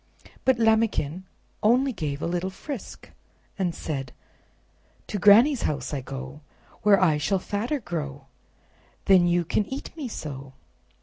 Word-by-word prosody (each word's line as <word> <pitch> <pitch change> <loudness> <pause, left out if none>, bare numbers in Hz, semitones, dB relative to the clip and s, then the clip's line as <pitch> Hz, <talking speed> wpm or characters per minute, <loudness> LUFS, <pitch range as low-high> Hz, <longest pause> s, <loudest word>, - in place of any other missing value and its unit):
But 260 -2 +4
Lambikin 220 -7 +1 0.4
only 250 +5 +3
gave 150 -6 -4
a - - 0
little 175 +2 -1
frisk 245 +5 -8 0.5
and 180 -3 0
said: 135 -5 -5 0.9
"To 205 - -4
Granny's 230 +8 +6
house 140 -2 -2
I 140 - -2
go, 135 +2 -8 0.4
Where 205 -2 +5
I 160 -5 +3
shall 190 +7 +1
fatter 215 +10 -2
grow, 145 - -5 0.8
Then 185 -3 +6
you 175 0 +2
can 210 - +1
eat 270 +4 -6
me 300 -5 -5
so." 140 - -7
180 Hz, 135 wpm, -25 LUFS, 145-220 Hz, 0.9 s, Granny's